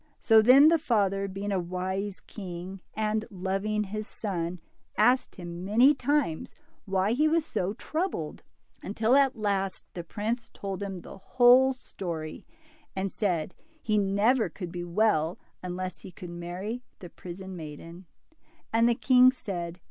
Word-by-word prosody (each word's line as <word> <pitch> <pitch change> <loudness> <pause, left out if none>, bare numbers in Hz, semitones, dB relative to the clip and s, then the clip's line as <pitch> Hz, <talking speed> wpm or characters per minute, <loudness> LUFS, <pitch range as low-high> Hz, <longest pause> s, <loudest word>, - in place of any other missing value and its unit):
So, 225 -1 +6
then, 265 +7 +8
the 330 0 +4
father, 200 -7 +1
being 195 +1 -4
a 195 - +1
wise 185 +3 -3
king, 185 -1 -8
and 215 0 0
loving 195 +2 -1
his 215 +2 -5
son, 180 -4 -4 0.4
asked 245 +5 +3
him 175 -1 -7
many 235 +9 +5
times 280 - -1 0.3
why 195 +1 +1
he 295 +6 +3
was 320 0 +2
so 195 - -2
troubled, 310 - -3 0.4
until 220 +5 +1
at 275 -1 +4
last 200 -3 -1
the 175 - -5
prince 220 +6 -3
told 195 -1 -5
him 195 -3 -5
the - - -11
whole 255 +5 +5
story, 170 -10 -6 0.5
and 190 0 -2
said 180 -5 -1 0.3
he 215 -1 +2
never 205 +5 +2
could 180 -4 -7
be 175 0 -5
well 175 -3 +1 0.2
unless 185 0 -5
he 190 - -11
could 175 0 -9
marry 180 +7 -5 0.2
the 175 - -11
prison 185 +1 -8
maiden. 165 +3 -9 0.7
And 230 +1 +4
the 235 - +2
king 255 +1 +6
said. 175 -8 -6
195 Hz, 150 wpm, -28 LUFS, 180-225 Hz, 0.7 s, then